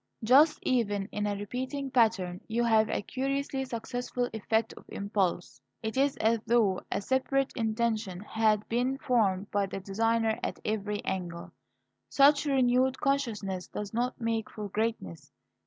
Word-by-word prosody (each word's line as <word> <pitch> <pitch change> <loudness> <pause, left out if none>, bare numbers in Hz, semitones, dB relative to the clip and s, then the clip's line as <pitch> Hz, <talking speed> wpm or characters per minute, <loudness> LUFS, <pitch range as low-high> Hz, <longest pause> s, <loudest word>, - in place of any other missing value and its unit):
Thus, 280 +7 +6
even 205 -6 +1
in 210 0 -2
a 205 - -1
repeating 260 +7 -4
pattern, 215 -7 +2
you 235 +2 0
have 220 -2 +3
a - - -1
curiously 270 +1 -2
successful 245 +1 -3
effect 220 +1 0
of - - -14
impulse. 190 - -2 0.2
It 220 +2 -3
is 275 +1 +2
as 225 +1 +2
though 220 -5 +3
a - - 0
separate 265 +4 0
intention 220 -5 -1
had 215 0 +1
been 250 +3 0
formed 205 -7 +1
by 200 -1 +1
the 195 - -5
designer 225 +3 0
at - - -3
every 210 -1 -2
angle. 175 -2 -4 0.6
Such 285 +1 +5
renewed 260 -1 +2
consciousness 220 -10 -1
does 210 0 -6
not 245 +3 -1
make 230 -2 -1
for 210 -2 -6
greatness. 210 - -3
225 Hz, 145 wpm, -29 LUFS, 205-255 Hz, 0.6 s, Thus